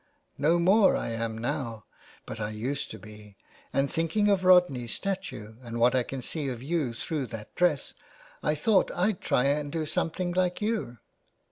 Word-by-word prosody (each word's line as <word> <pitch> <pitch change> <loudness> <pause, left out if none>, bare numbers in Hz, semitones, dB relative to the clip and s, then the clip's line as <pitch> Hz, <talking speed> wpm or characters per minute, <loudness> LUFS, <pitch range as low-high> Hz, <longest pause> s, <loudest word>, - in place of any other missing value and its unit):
" - - -43
* - - -41
No 170 - +5
more 190 +4 +5
I - - -3
am 115 -1 -3
now, 120 -3 -3 0.4
but 110 - -7
I 105 -1 -2
used 125 +7 -3
to - - -7
be; 105 -1 -13 0.3
and 135 0 +2
thinking 165 +8 +1
of 195 -2 +2
Rodney's 180 -11 +4
statue 190 - -4
and 120 -1 -6
what 120 +1 +5
I 130 - +3
can 130 +1 -5
see 150 +1 -3
of 125 -1 -6
you 150 -4 0
through 140 +3 -3
that 110 -2 -9
dress 175 -6 +1 0.5
I 150 - +1
thought 190 +6 +3
I'd 185 +1 +1
try 125 - +2
and 145 +1 0
do 160 0 -2
something 175 +4 -1
Hke 180 0 +1
you.' 210 - -2
145 Hz, 190 wpm, -28 LUFS, 115-180 Hz, 0.5 s, No